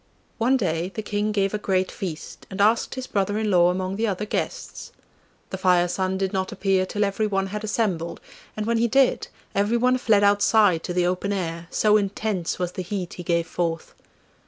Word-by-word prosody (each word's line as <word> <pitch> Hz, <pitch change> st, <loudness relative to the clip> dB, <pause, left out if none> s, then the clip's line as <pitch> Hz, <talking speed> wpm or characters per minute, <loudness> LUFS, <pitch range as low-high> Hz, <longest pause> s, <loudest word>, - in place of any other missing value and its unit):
One 250 Hz, +4 st, +3 dB
day 175 Hz, -4 st, -1 dB
the 220 Hz, -, -3 dB
King 210 Hz, +1 st, -1 dB
gave 195 Hz, -1 st, 0 dB
a 210 Hz, -, -1 dB
great 190 Hz, -2 st, 0 dB
feast, 170 Hz, -5 st, -7 dB
and 190 Hz, -, -7 dB
asked 220 Hz, +5 st, +2 dB
his 260 Hz, -1 st, -4 dB
brother 205 Hz, -1 st, -1 dB
in 215 Hz, -1 st, 0 dB
law 175 Hz, -1 st, +5 dB
among 185 Hz, +1 st, -2 dB
the 225 Hz, +1 st, 0 dB
other 205 Hz, 0 st, -2 dB
guests. -, -, -4 dB, 0.6 s
The 190 Hz, -, -4 dB
Fire 180 Hz, -2 st, +3 dB
son 190 Hz, +1 st, -1 dB
did 190 Hz, -1 st, -2 dB
not 190 Hz, -1 st, -1 dB
appear 190 Hz, -1 st, +1 dB
till 205 Hz, +2 st, -1 dB
everyone 200 Hz, -1 st, 0 dB
had 210 Hz, 0 st, -4 dB
assembled, 205 Hz, -6 st, -1 dB, 0.4 s
and 215 Hz, -, -2 dB
when 230 Hz, 0 st, +1 dB
he 235 Hz, -, +3 dB
did, 270 Hz, +2 st, +2 dB, 0.3 s
everyone 235 Hz, +5 st, +2 dB
fled 210 Hz, -4 st, +3 dB
outside 205 Hz, -3 st, +4 dB
to 175 Hz, -, -3 dB
the 180 Hz, -1 st, +2 dB
open 185 Hz, +3 st, -1 dB
air, 170 Hz, -3 st, -3 dB
so 210 Hz, +2 st, +3 dB
intense 200 Hz, -3 st, -2 dB
was 180 Hz, -1 st, -2 dB
the 185 Hz, -, -5 dB
heat 185 Hz, -1 st, -4 dB
he 175 Hz, -, -7 dB
gave 170 Hz, -1 st, +1 dB
forth. 165 Hz, -2 st, -3 dB
195 Hz, 195 wpm, -24 LUFS, 180-215 Hz, 0.6 s, law